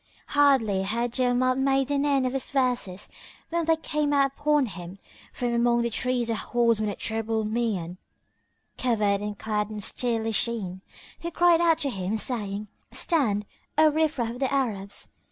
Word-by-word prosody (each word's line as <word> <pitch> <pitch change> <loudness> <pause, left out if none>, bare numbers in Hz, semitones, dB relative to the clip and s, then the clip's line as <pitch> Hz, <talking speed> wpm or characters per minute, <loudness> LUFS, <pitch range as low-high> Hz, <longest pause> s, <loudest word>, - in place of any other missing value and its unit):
[FN#14] - - -22
Hardly 265 -9 +4
had 230 +5 -1
Jawamard 255 0 +2
made 270 0 +2
an 285 0 +1
end 275 -2 +2
of 255 - -1
his 270 - -1
verses 250 -8 0 0.4
when 335 0 0
there 325 0 +4
came 300 -2 -1
out 275 -1 +3
upon 295 -1 +2
him 180 -3 -8 0.3
from 245 -1 -2
among 235 0 +3
the 235 - -1
trees 250 0 0
a 230 - 0
horseman 230 -1 +1
of 200 - -5
terrible 220 0 -1
mien 210 -6 -2 0.8
covered 210 -5 +1
and 210 0 -4
clad 210 -1 -2
in 215 -1 -6
steely 225 +1 0
sheen, 205 -5 -2 0.4
who 340 - -4
cried 345 0 +4
out 330 -2 +4
to 285 -4 -1
him, 195 +1 -2
saying, 210 -3 -2 0.2
"Stand, 220 - +1 0.3
O 310 0 +6
riff 315 0 +1
raff 235 -2 -1
of 245 - -8
the 270 -1 0
Arabs! 210 -8 -2
240 Hz, 170 wpm, -26 LUFS, 210-275 Hz, 0.8 s, O